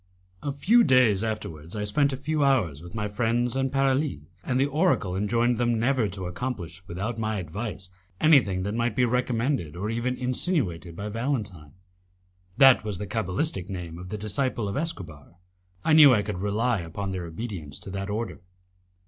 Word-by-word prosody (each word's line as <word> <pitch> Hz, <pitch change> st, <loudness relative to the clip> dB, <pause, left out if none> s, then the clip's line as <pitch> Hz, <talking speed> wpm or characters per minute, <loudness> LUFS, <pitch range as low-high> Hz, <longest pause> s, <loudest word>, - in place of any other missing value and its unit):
A 145 Hz, -, -2 dB
few 210 Hz, -, +4 dB
days 125 Hz, -, +4 dB
afterwards 95 Hz, -6 st, -5 dB
I 105 Hz, -, -2 dB
spent 140 Hz, +8 st, +2 dB
a 130 Hz, -, -3 dB
few 150 Hz, +2 st, -1 dB
hours 105 Hz, -, +2 dB
with 85 Hz, +3 st, -11 dB
my 105 Hz, -1 st, -1 dB
friends 120 Hz, +3 st, 0 dB
and 135 Hz, 0 st, 0 dB
Paralis, 135 Hz, -, +1 dB, 0.2 s
and 130 Hz, 0 st, 0 dB
the 135 Hz, -, +4 dB
oracle 145 Hz, -, +1 dB
enjoined 115 Hz, +4 st, +1 dB
them 120 Hz, -1 st, +2 dB
never 125 Hz, -1 st, +2 dB
to 95 Hz, -1 st, -6 dB
accomplish 90 Hz, -3 st, -5 dB
without 100 Hz, +7 st, -4 dB
my 110 Hz, 0 st, -1 dB
advice 95 Hz, +1 st, -6 dB, 0.3 s
anything 120 Hz, -, +4 dB
that 100 Hz, +2 st, -2 dB
might 115 Hz, -1 st, 0 dB
be 125 Hz, -, +3 dB
recommended 120 Hz, -, 0 dB
or 105 Hz, +5 st, -3 dB
even 125 Hz, +2 st, -1 dB
insinuated 125 Hz, -, -1 dB
by 100 Hz, +4 st, -5 dB
Valentine; 105 Hz, -, -3 dB, 0.8 s
that 135 Hz, -4 st, +7 dB
was 105 Hz, -3 st, -4 dB
the 105 Hz, -, -4 dB
cabalistic 100 Hz, -, -2 dB
name 85 Hz, -3 st, -6 dB
of 90 Hz, +1 st, -9 dB
the 105 Hz, -, -4 dB
disciple 110 Hz, +2 st, -1 dB
of 100 Hz, -, -3 dB
Escobar. 85 Hz, -, -5 dB, 0.5 s
I 160 Hz, -, +4 dB
knew 150 Hz, -5 st, +9 dB
I 105 Hz, -, +1 dB
could 100 Hz, -3 st, -4 dB
rely 105 Hz, +3 st, 0 dB
upon 90 Hz, +4 st, -5 dB
their 90 Hz, -2 st, -4 dB
obedience 85 Hz, -, -6 dB
to 95 Hz, -, -9 dB
that 100 Hz, +1 st, -4 dB
order. 110 Hz, +3 st, -4 dB
110 Hz, 175 wpm, -26 LUFS, 95-130 Hz, 0.8 s, knew